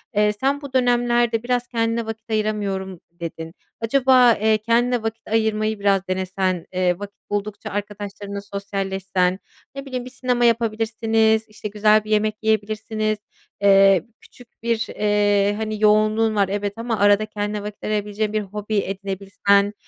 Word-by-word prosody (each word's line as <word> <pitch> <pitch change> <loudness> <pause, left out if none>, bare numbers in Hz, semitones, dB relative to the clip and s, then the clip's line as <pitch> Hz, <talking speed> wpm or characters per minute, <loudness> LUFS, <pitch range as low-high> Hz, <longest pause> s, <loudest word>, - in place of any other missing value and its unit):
Eee, 210 0 +3
sen 275 +6 -1
bu 280 -2 -9
dönemlerde 240 -2 +2
"Biraz 245 0 -1
kendine 230 -1 -1
vakit 225 0 -7
ayıramıyorum," 200 -4 -2
dedin. 165 -1 -7 0.3
Acaba, 255 0 +5
eee, 220 0 +2
kendine 235 +2 +1
vakit 225 0 -5
ayırmayı 220 -1 0
biraz 195 -1 +1
denesen, 185 -1 -1
eee, 180 0 +1
vakit 205 0 -9
buldukça 205 0 -3
arkadaşlarınla 205 0 -5
sosyalleşsen, 195 -2 -2 0.4
ne 275 0 -6
bileyim 255 -2 -4
bir - - -8
sinema 250 -1 0
yapabilirsiniz, 225 -1 +2
işte, 210 0 -7
güzel 210 +1 +3
bir 215 - -8
yemek 215 0 +2
yiyebilirsiniz, 215 0 -1 0.4
eee, 195 -3 +6 0.2
küçük 245 -2 -19
bir, 230 -1 0
eee, 205 -1 +2
hani, 215 -1 -4
yoğunluğun 215 +1 +3
var 200 -2 +2
evet 205 0 -2
ama 230 -2 -2
arada 205 +1 +4
kendine 210 -1 -4
vakit 210 0 -8
ayırabileceğin 210 0 -2
bir 215 - +1
hobi 210 +1 -4
edinebilsen, 200 +1 0
215 Hz, 140 wpm, -22 LUFS, 200-225 Hz, 0.4 s, eee